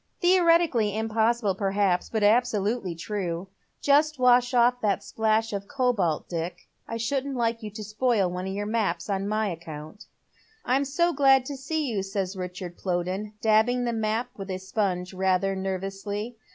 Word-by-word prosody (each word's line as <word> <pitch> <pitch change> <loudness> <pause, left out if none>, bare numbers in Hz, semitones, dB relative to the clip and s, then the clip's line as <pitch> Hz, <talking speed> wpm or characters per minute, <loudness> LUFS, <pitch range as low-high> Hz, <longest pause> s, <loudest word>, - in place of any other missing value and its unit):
"Theoretically 335 - +3
impossible, 225 -1 +1
perhaps, 195 -2 0
but 220 -2 -1
absolutely 210 -3 +2
true. 180 0 -4 0.3
Just 300 +2 +3
wash 245 -1 +4
off 245 0 +3
that 200 -1 0
splash 220 0 0
of 200 0 -4
cobalt, 240 - 0
Dick. 170 +1 -5 0.2
I 230 - -4
shouldn't 270 +4 -2
like 230 -1 0
you 215 - -5
to 215 +1 -8
spoil 215 -1 +1
one 180 +1 -4
of 190 - -3
your 205 +1 -2
maps 210 -4 -1
on 195 0 -1
my 215 0 0
account." 160 +2 -8 0.3
" - - -32 0.2
I'm 265 +3 +2
so 340 +5 +1
glad 270 -2 +5
to 280 - -5
see 300 +3 -2
you," 220 -7 -1
says 195 0 -3
Richard 180 -1 -6
Plowden, 185 +3 -2
dabbing 220 +3 +3
the 240 -1 -1
map 225 +2 -1
with 195 -3 -8
a 185 - -2
sponge 190 -1 -2
rather 190 +1 +1
nervously. 195 +4 -4
215 Hz, 165 wpm, -26 LUFS, 190-245 Hz, 0.3 s, glad